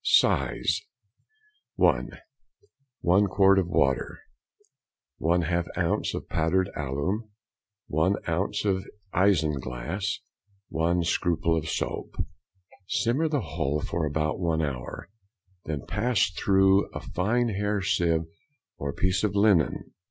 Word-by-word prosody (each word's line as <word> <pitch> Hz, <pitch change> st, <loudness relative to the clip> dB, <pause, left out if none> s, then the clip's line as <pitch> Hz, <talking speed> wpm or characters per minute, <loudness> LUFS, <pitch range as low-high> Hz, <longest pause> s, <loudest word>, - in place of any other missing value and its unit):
Size:— -, -, +2 dB, 0.9 s
(1.) -, -, +3 dB, 0.9 s
1 95 Hz, +4 st, +4 dB
quart 95 Hz, 0 st, +5 dB
of 90 Hz, -, 0 dB
water. 65 Hz, -6 st, +1 dB, 1.0 s
1/2 85 Hz, +1 st, +1 dB
ounce -, -, 0 dB
of -, -, -6 dB
powdered 85 Hz, +3 st, +1 dB
alum. 75 Hz, -, -2 dB, 0.6 s
1 80 Hz, +6 st, +1 dB
ounce 90 Hz, +5 st, -1 dB
of 95 Hz, -1 st, 0 dB, 0.3 s
isinglass. 80 Hz, -1 st, 0 dB, 0.5 s
1 85 Hz, +2 st, +1 dB
scruple 85 Hz, -1 st, +1 dB
of 80 Hz, 0 st, -2 dB
soap. -, -, -3 dB, 0.7 s
Simmer 130 Hz, +11 st, +1 dB
the 150 Hz, -3 st, 0 dB
whole 75 Hz, -4 st, -2 dB
for 80 Hz, +1 st, -2 dB
about 75 Hz, +2 st, -1 dB
one 80 Hz, -3 st, 0 dB
hour, 65 Hz, -4 st, -5 dB, 0.6 s
then 75 Hz, -4 st, -4 dB
pass 115 Hz, -4 st, +1 dB
through 95 Hz, +1 st, +3 dB
a -, -, -2 dB
fine 120 Hz, +6 st, 0 dB
hair 105 Hz, 0 st, -1 dB
sieve 85 Hz, -3 st, +1 dB, 0.5 s
or 70 Hz, 0 st, -2 dB
piece 95 Hz, +1 st, 0 dB
of 105 Hz, -1 st, 0 dB
linen. 100 Hz, -6 st, +2 dB
90 Hz, 110 wpm, -27 LUFS, 80-100 Hz, 1.0 s, quart